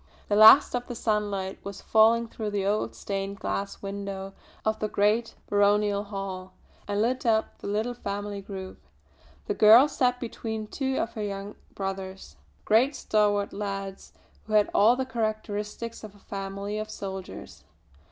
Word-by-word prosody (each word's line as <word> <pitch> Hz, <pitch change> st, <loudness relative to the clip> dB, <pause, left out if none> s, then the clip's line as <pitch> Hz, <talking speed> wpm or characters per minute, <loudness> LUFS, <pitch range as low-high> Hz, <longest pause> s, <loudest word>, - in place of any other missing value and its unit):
The 205 Hz, -, +2 dB
last 220 Hz, +7 st, +9 dB
of 245 Hz, 0 st, -2 dB
the 245 Hz, -, -6 dB
sunlight 205 Hz, -4 st, -1 dB
was 200 Hz, 0 st, -8 dB
falling 230 Hz, +1 st, +4 dB
through 220 Hz, -1 st, -5 dB
the 200 Hz, -2 st, -1 dB
old 205 Hz, +2 st, 0 dB
stained 195 Hz, 0 st, -4 dB
glass 200 Hz, +1 st, -4 dB
window 195 Hz, -1 st, -5 dB, 0.3 s
of 220 Hz, 0 st, 0 dB
the 215 Hz, -, -1 dB
great 210 Hz, +3 st, +1 dB
baronial 205 Hz, 0 st, +2 dB
hall, 195 Hz, -2 st, -6 dB, 0.3 s
and 205 Hz, 0 st, -1 dB
lit 255 Hz, +3 st, 0 dB
up 220 Hz, -3 st, +1 dB
the -, -, -7 dB
little 215 Hz, +4 st, -1 dB
family 205 Hz, -3 st, -5 dB
group. 190 Hz, -1 st, -8 dB, 0.6 s
The -, -, -1 dB
girl 225 Hz, +6 st, +8 dB
sat 250 Hz, -3 st, +1 dB
between 220 Hz, -2 st, -5 dB
two 265 Hz, +4 st, -2 dB
of 230 Hz, -, -2 dB
her 220 Hz, -, -5 dB
young 200 Hz, 0 st, -4 dB, 0.2 s
brothers, 190 Hz, -1 st, -5 dB, 0.3 s
great 250 Hz, +7 st, +3 dB
stalwart 205 Hz, -4 st, +1 dB
lads 195 Hz, -1 st, -5 dB, 0.4 s
who 215 Hz, -, -5 dB
had 210 Hz, -1 st, +4 dB
all 220 Hz, +4 st, +5 dB
the 260 Hz, 0 st, -2 dB
characteristics 215 Hz, -1 st, -4 dB
of 210 Hz, -1 st, -10 dB
a -, -, -18 dB
family 200 Hz, +1 st, -5 dB
of 215 Hz, 0 st, -5 dB
soldiers. 190 Hz, -, -8 dB
210 Hz, 155 wpm, -27 LUFS, 200-220 Hz, 0.6 s, last